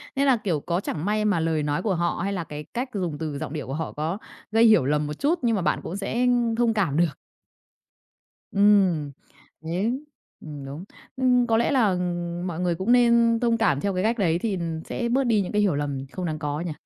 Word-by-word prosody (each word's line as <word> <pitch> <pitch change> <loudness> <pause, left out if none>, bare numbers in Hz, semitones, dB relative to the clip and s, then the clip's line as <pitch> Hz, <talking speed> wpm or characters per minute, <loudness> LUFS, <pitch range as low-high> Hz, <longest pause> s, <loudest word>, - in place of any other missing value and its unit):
Nên 275 +1 +2
là, 270 -2 +5
kiểu, 185 -8 -1
có 170 +4 -1
chẳng 165 -4 -4
may 210 +1 0
mà 205 -5 +2
lời 160 -2 0
nói 145 +3 -1
của 200 -4 +1
họ, 170 0 -1
hay 200 +1 -1
là 180 -3 -2
cái 150 -1 -7
cách 250 +2 -2
dùng 180 -7 -2
từ 150 -2 -4
giọng 155 0 -5
điệu 150 - -5
của 135 - -4
họ 160 +2 -3
có 160 +5 -2 0.3
gây 225 +1 +4
hiểu 215 - +5
lầm 150 +1 +1
một 150 - -4
chút, 305 - 0
nhưng 235 -2 +2
mà 195 - -1
bạn - - +1
cũng 175 - -5
sẽ, 200 0 -4
ưm, 240 -2 +2
thông 235 -1 +2
cảm 180 -10 0
được. 170 -3 +1 1.4
Ừm. 195 -7 +3 0.5
Đấy. 190 +11 -1 0.4
Ừm, 145 -3 -8
đúng. 140 +5 -7 0.3
Ừm, 250 -2 +3
có 225 -1 +3
lẽ 235 - +2
là, 245 -6 +3
ừm, 175 -1 -2
mọi 170 -2 -4
người 175 -1 0
cũng 190 +7 -1
nên 235 -1 +4
thông 235 -1 +2
cảm 210 -12 +2
theo 200 - -1
cái 185 0 -1
cách 230 +3 +1
đấy 170 -5 +1
thì 205 -1 -1 0.3
sẽ 235 -1 -3
bớt 265 +3 +2
đi 225 -5 +2
những 185 - -4
cái 210 - +2
hiểu 195 -7 +2
lầm 140 -2 -3
không 185 +2 -4
đáng 155 -2 -3
có 150 0 -3
nhỉ? 175 -1 -3
185 Hz, 240 wpm, -25 LUFS, 160-225 Hz, 1.4 s, là